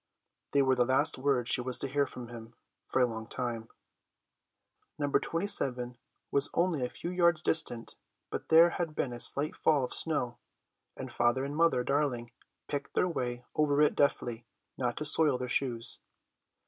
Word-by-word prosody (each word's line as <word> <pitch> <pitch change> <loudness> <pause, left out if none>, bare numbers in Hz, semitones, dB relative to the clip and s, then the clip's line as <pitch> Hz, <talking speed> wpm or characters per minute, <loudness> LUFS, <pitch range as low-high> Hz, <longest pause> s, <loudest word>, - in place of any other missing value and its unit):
They 140 -1 +4
were 130 0 +3
the 125 -1 +3
last 130 +4 +2
words 130 -3 +1
she - - +5
was 125 0 -1
to - - +2
hear 140 +1 +1
from 120 -2 -9
him 115 -1 -10 0.3
for - - 0
a 125 - +5
long 110 -2 -6
time. 115 -2 -4 1.3
No. 145 - -1
27 135 -11 0 0.4
was 140 0 +1
only 170 -6 +1
a 125 - -1
few 170 - -6
yards 170 -2 +2
distant, 120 -7 0 0.3
but - - -5
there 165 +2 +7
had 170 -4 -3
been 125 - -2
a 120 - -7
slight 145 +5 +1
fall 150 -4 +2
of 125 - -2
snow, 135 -7 0 0.6
and 130 -2 -7
Father 120 +3 +1
and 140 +1 -5
Mother 165 -6 +3
Darling 130 -4 -1 0.4
picked 145 -1 -5
their - - +3
way 125 -7 -3
over 150 -2 +2
it 150 - +4
deftly 120 -4 0 0.3
not 125 -2 -2
to 150 - -3
soil 150 -2 +2
their 125 0 -4
shoes. 120 -2 -2
130 Hz, 175 wpm, -30 LUFS, 120-150 Hz, 1.3 s, there